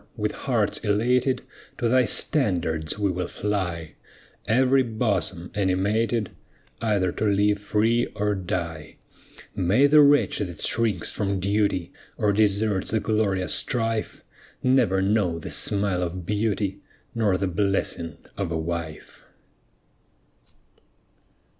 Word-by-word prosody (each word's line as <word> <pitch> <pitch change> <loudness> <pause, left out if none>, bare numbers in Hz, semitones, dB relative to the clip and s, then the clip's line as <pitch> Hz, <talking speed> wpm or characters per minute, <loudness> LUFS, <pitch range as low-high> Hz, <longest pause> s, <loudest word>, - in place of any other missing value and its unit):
with - - -1
hearts - - -1
elated 125 +5 +1 0.3
To 120 - 0
thy 125 +1 +4
standard 85 - 0
we 100 -2 +1
will 90 -1 -3
fly; 90 -7 -3 0.5
Every 130 +4 +4
bosom 105 -7 -2
animated 105 +3 0 0.5
Either 100 -5 +1
to 110 - -3
live 105 0 +2
free 110 +3 +1
or 105 0 0
die. 85 -5 -4 0.6
May 100 +10 +3
the 150 +1 +7
wretch 145 0 +4
that 85 -4 -4
shrinks 110 -7 0
from 100 -2 -2
duty, 100 -2 0 0.2
Or 105 -1 +2
deserts 105 -1 +1
the 110 - +1
glorious 105 -4 0
strife, 115 -2 -1 0.4
Never 125 -7 +3
know 95 -4 +1
the 80 - -7
smile 100 -3 +1
of 90 0 -4
beauty, 105 -1 -1 0.3
Nor 105 -5 +1
the 100 - -1
blessing 90 -4 -1 0.2
of 95 -4 -3
a 80 - -1
wife. 80 -1 -6
100 Hz, 115 wpm, -24 LUFS, 90-110 Hz, 0.6 s, the